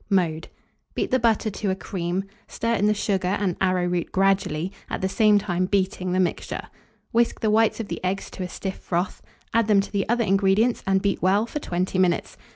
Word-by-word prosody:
Mode. 165 -5 +1 0.5
Beat - - -1
the 260 - +3
butter 225 -2 +2
to 200 0 -3
a 190 - +1
cream; 185 -1 -3 0.2
stir 230 0 -1
in 210 -2 +2
the 210 - +4
sugar 195 -3 0
and 190 -4 0
arrowroot 180 -2 0
gradually, 190 -3 +1 0.2
at - - -3
the 190 - +1
same 210 +1 +4
time 185 -3 0
beating 185 -2 0
the 185 - +1
mixture. 180 -2 -1 0.5
Whisk 235 0 +2
the 215 - +2
whites 225 +1 +3
of 225 - -3
the - - -6
eggs 185 +2 -2
to - - -8
a 180 - -3
stiff 190 +2 -5
froth, 175 +1 -2 0.3
add 230 -1 +3
them 210 -2 +5
to 195 - -2
the 200 -1 -1
other 235 0 +2
ingredients, 195 +4 +2
and 190 0 +2
beat 200 -2 0
well 195 +4 +3
for 295 - -5
20 185 -5 -2
minutes. 180 -2 +1
195 Hz, 205 wpm, -24 LUFS, 185-210 Hz, 0.5 s, them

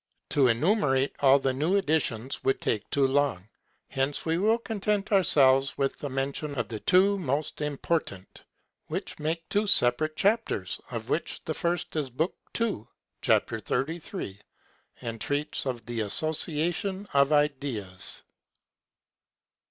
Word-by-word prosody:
To 140 -3 +4
enumerate 135 - +2
all 135 -1 +6
the 135 -1 0
new 155 +9 +1
additions 140 - 0
would 135 - +1
take 110 -1 -2
too 140 -1 +2
long; 135 -8 +1 0.4
hence 135 +2 -2
we 165 +1 +1
will 220 +4 +3
content 210 -3 -2
ourselves 135 -8 +4
with 135 -1 -1
the 145 - -4
mention 140 +2 -2
of 115 - -2
the 110 -2 -5
two 195 - +4
most 150 -2 -2
important, 150 - -3 0.4
which - - -5
make 160 +2 -3
two 210 +1 +1
separate 155 -1 +4
chapters, 225 +3 0
of - - -6
which - - -2
the - - -2
first 175 -1 -2
is 150 -4 -1
Book 155 +9 -1 0.3
II., 215 - -1 0.3
chap. - - +3
33, 150 - -4 0.6
and 115 -2 -5
treats 145 0 -1
of 120 -4 -4
the 120 -1 -4
Association 160 - 0
of 140 +1 +4
Ideas. 135 -11 -1
145 Hz, 135 wpm, -27 LUFS, 130-170 Hz, 0.6 s, all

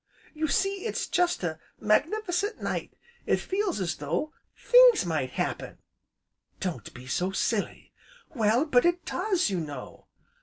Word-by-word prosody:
"You 315 0 -1
see, 390 +6 0
it's - - -2
such 355 - +2
a 160 -2 -2 0.2
magnif'cent 360 - +1
night! - - -4 0.3
It - - +4
feels 385 - -1
as 180 -3 -2
though 170 - -2 0.2
things - - +6
might 155 -6 -1
happen!" - - -3 0.8
"Don't 165 - -4
be 125 - -10
so 175 +9 -1
silly!" 200 +2 -2 0.4
"Well, 230 +2 +2
but 250 -6 +4
it 345 +1 +1
does, 370 - 0
you 185 - 0
know." 145 -5 -8
275 Hz, 140 wpm, -27 LUFS, -, 0.8 s, things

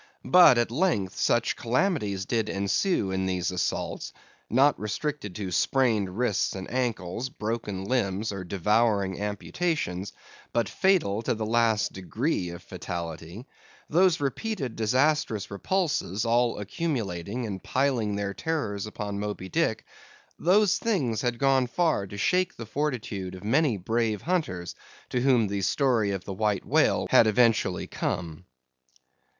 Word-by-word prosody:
But 175 -8 +7
at 120 -1 +1
length, 120 - 0
such 120 -1 +1
calamities 115 - 0
did 110 0 -1
ensue 100 - 0
in 95 0 -1
these 90 -1 -1
assaults—not 130 +8 -1
restricted 105 - -3
to 100 -3 -4
sprained 110 -4 +1
wrists 120 -6 0
and 95 -1 -6
ankles, 120 -2 -2
broken 105 -4 -4
limbs, 105 -3 0
or 100 -2 -5
devouring 100 +1 +1
amputations—but 105 - -3
fatal 175 - +2
to 115 - -1
the 110 0 -3
last 115 -1 +2
degree 95 - -2
of 85 +1 -9
fatality; 85 +5 -6 0.5
those 175 +1 +4
repeated 140 - -3
disastrous 125 -1 +1
repulses, 120 - -1
all 120 +1 +2
accumulating 105 - -3
and 100 -3 -5
piling 125 -6 0
their 100 -1 -2
terrors 110 -9 -2
upon 105 -1 -5
Moby 100 -2 -4
Dick; - - 0 0.5
those 200 +3 +4
things 135 - 0
had 120 -2 -1
gone 135 -1 +3
far 155 - +1
to 100 - -8
shake 180 - +1
the 115 - -6
fortitude 110 -8 -3
of 95 - -11
many 130 +1 +2
brave 110 +2 -1
hunters, 150 - -2 0.4
to 125 - 0
whom 125 -4 +4
the 100 0 -2
story 120 -2 +2
of 95 -2 -3
the 100 - -5
White 105 0 0
Whale - - +3
had 115 - +7
eventually 110 -4 +2
come. 85 -1 -4
110 Hz, 135 wpm, -27 LUFS, 100-135 Hz, 0.5 s, But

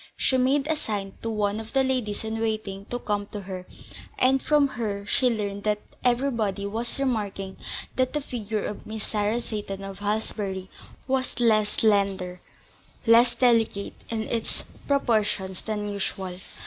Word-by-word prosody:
She 260 - +2
made 265 +2 +3
a 315 +1 +1
sign 205 -9 -3
to 230 - -2
one 210 -1 0
of 225 0 -8
the 270 -1 +4
ladies 250 -6 0
in 220 0 -2
waiting 215 -3 -2
to 245 - -3
come 205 -3 -1
to 205 - -6
her, 185 -1 -6 0.5
and 265 +1 +4
from 295 -2 +4
her 205 -5 -3
she 250 +4 +4
learned 205 -3 -2
that 210 -1 +3 0.3
everybody 235 -6 +1
was 225 +4 -2
remarking 205 -7 -1 0.4
that 255 -1 +2
the 300 - +1
figure 220 -5 -3
of 210 - -5
Miss 215 0 -4
Sarah 210 +2 +1
Seyton 205 -3 -4
of 195 0 -7
Halsbury 205 -2 -2 0.4
was 260 -2 0
less 215 -3 +4
slender, 195 -4 +2 0.6
less 235 +1 +6
delicate 230 -5 +3 0.2
in 225 -1 0
its 230 +1 -2 0.2
proportions 215 -8 +1
than 210 -1 -2
usual. 190 -2 -3
215 Hz, 155 wpm, -26 LUFS, 200-240 Hz, 0.6 s, less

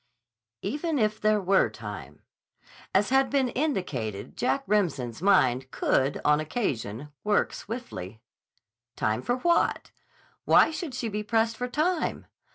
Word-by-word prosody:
D. 195 - -1
C. - - -5
"Even 310 +1 -1
if 215 -2 0
there 215 0 +3
were 190 - +3
time." 105 - -9 0.7
As 200 +2 +2
has 270 0 +4
been 270 -3 +2
indicated, 155 - -3
Jack 270 +3 0
Remsen's 160 - 0
mind 130 -10 +3
could, 135 +1 +1
on 150 0 +4
occasion, 145 - -3
work 210 0 +1
swiftly. 115 - -7 0.8
Time 110 +2 0
for 245 - 0
what? 340 +6 +1 0.5
Why - - +5
should 315 -4 -5
she 240 - -2
be 210 -1 -3
pressed 225 +1 +1
for 250 +2 -3
time? 315 +6 -1
205 Hz, 140 wpm, -27 LUFS, -, 0.8 s, Why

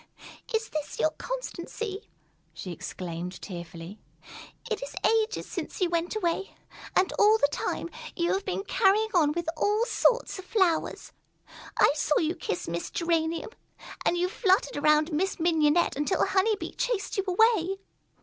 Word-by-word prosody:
"Is 445 -1 0
this 305 -1 -4
your 310 - +3
constancy?" 445 -2 -5 0.5
she 185 - -6
exclaimed 175 +1 -6
tearfully. 170 +1 -8 0.7
"It - - -2
is - - -7
ages 445 +1 +2
since - - -6
you 360 -3 +1
went 340 +3 0
away, 390 -1 -1 0.4
and 375 - +3
all 425 +1 +6
the 285 - +3
time, 335 - -2 0.3
you 340 -1 +1
have 390 - -1
been 390 0 -2
carrying 425 +2 +3
on 315 -5 +4
with 340 0 -3
all 420 +7 +2
sorts 485 -2 +2
of 375 - -9
flowers. 370 -6 +1 0.7
I - - +5
saw 300 0 +1
you 320 +1 +1
kiss 245 - -4
Miss 170 +1 -3
Geranium, 330 +2 -1 0.5
and 350 - +2
you 355 +1 +2
fluttered 380 0 +2
around 305 +2 +3
Miss 370 +6 0
Mignonette 320 0 +3
until 295 +7 +1
Honey 420 +3 +2
Bee - - -7
chased 480 -6 -2
you 390 - +2
away. 390 -1 +3
350 Hz, 150 wpm, -28 LUFS, 305-415 Hz, 0.7 s, all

